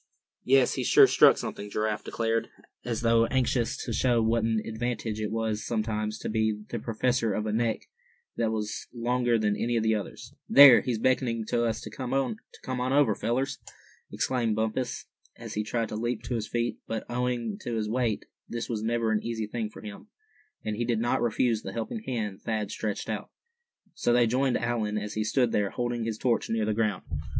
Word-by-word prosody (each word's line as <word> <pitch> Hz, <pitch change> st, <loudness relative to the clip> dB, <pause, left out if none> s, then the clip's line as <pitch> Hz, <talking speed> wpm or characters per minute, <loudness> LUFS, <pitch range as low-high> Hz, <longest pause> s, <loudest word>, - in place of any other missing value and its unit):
"Yes, 135 Hz, 0 st, +4 dB
he's -, -, -2 dB
sure -, -, +8 dB
struck -, -, +6 dB
something," 105 Hz, -, -5 dB
Giraffe 105 Hz, +1 st, -1 dB
declared, 115 Hz, 0 st, -1 dB, 0.3 s
as 115 Hz, -2 st, -2 dB
though 115 Hz, 0 st, +4 dB
anxious 125 Hz, -2 st, 0 dB
to 115 Hz, -, -3 dB
show 120 Hz, 0 st, +2 dB
what 115 Hz, 0 st, +2 dB
an 110 Hz, -1 st, +1 dB
advantage 110 Hz, -1 st, -3 dB
it 105 Hz, -, -1 dB
was 110 Hz, -1 st, -2 dB
sometimes 110 Hz, -1 st, -2 dB
to -, -, -6 dB
be 110 Hz, -1 st, 0 dB
the 120 Hz, -, -3 dB
possessor 115 Hz, -1 st, 0 dB
of 105 Hz, -, -2 dB
a 105 Hz, -, -1 dB
neck 115 Hz, 0 st, 0 dB, 0.5 s
that 115 Hz, -1 st, 0 dB
was 105 Hz, -1 st, -3 dB
longer 120 Hz, 0 st, +1 dB
than 105 Hz, -2 st, +1 dB
any 120 Hz, +2 st, 0 dB
of 110 Hz, -, +1 dB
the 110 Hz, 0 st, +3 dB
others. 105 Hz, -3 st, -5 dB, 0.2 s
"There, 140 Hz, -3 st, +10 dB
he's 125 Hz, -3 st, -1 dB
beckoning 115 Hz, -1 st, +1 dB
to 120 Hz, 0 st, +1 dB
us 115 Hz, -1 st, -1 dB
to 110 Hz, -, -8 dB
come 130 Hz, +3 st, -3 dB
on 125 Hz, 0 st, -3 dB
over, 140 Hz, -6 st, +4 dB
fellers!" 130 Hz, +6 st, -1 dB, 0.5 s
exclaimed 120 Hz, -4 st, 0 dB
Bumpus, 110 Hz, +3 st, -2 dB, 0.3 s
as -, -, -8 dB
he 105 Hz, -, -1 dB
tried 115 Hz, +2 st, -2 dB
to -, -, -5 dB
leap 120 Hz, 0 st, -2 dB
to 120 Hz, -, -4 dB
his 110 Hz, -2 st, -2 dB
feet; 120 Hz, 0 st, -2 dB
but, 115 Hz, -1 st, -3 dB
owing 120 Hz, -3 st, -2 dB
to 120 Hz, -, -4 dB
his 110 Hz, -1 st, -1 dB
weight, 115 Hz, -1 st, -1 dB, 0.2 s
this 120 Hz, 0 st, -4 dB
was 110 Hz, -3 st, -3 dB
never 115 Hz, 0 st, 0 dB
an 110 Hz, -, +1 dB
easy 115 Hz, -2 st, -3 dB
thing 110 Hz, 0 st, -3 dB
for -, -, -12 dB
him, 105 Hz, -, -9 dB, 0.6 s
and 105 Hz, -1 st, -2 dB
he 120 Hz, -, 0 dB
did 115 Hz, -2 st, 0 dB
not 120 Hz, +1 st, +1 dB
refuse 115 Hz, -1 st, +1 dB
the 95 Hz, -, -7 dB
helping 115 Hz, -, -4 dB
hand 105 Hz, -6 st, -3 dB
Thad 110 Hz, -2 st, -2 dB
stretched 105 Hz, -2 st, -3 dB
out. -, -, -4 dB, 0.6 s
So 120 Hz, -, +1 dB
they 120 Hz, 0 st, +5 dB
joined 125 Hz, +2 st, +1 dB
Allan, 115 Hz, -3 st, -1 dB
as 105 Hz, 0 st, -4 dB
he 110 Hz, -, -1 dB
stood 120 Hz, +2 st, +2 dB
there, 100 Hz, -1 st, +1 dB
holding 120 Hz, 0 st, -2 dB
his 110 Hz, -2 st, -2 dB
torch 120 Hz, -1 st, 0 dB
near 110 Hz, -1 st, 0 dB
the 110 Hz, -, 0 dB
ground. 105 Hz, -2 st, 0 dB
115 Hz, 200 wpm, -28 LUFS, 110-120 Hz, 0.6 s, There